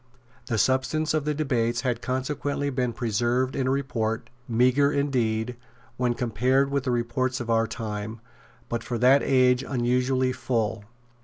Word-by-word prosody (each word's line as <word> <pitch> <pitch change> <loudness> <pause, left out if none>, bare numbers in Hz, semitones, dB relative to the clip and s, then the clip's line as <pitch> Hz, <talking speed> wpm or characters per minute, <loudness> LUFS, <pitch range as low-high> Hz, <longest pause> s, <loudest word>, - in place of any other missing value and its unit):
The 115 -4 -1
substance 130 +7 +1
of 155 -2 0
the 150 0 0
debates 120 -6 0
has 125 -3 -1
consequently 140 +2 -2
been 125 -2 0
preserved 120 +2 0
in 135 -2 0
a - - +2
report, 120 -5 -2 0.2
meagre, 130 +5 +3
indeed, 125 -5 0 0.4
when 125 -1 0
compared 130 +4 +1
with 140 -1 -1
the - - 0
reports 120 +2 -1
of 120 -1 -3
our 115 0 +3
time, 110 0 -5 0.5
but 120 - -3
for 120 - -3
that 130 +4 +5
age 125 -2 +3
unusually 130 0 +1
full. 115 -4 -2
125 Hz, 150 wpm, -26 LUFS, 115-135 Hz, 0.5 s, that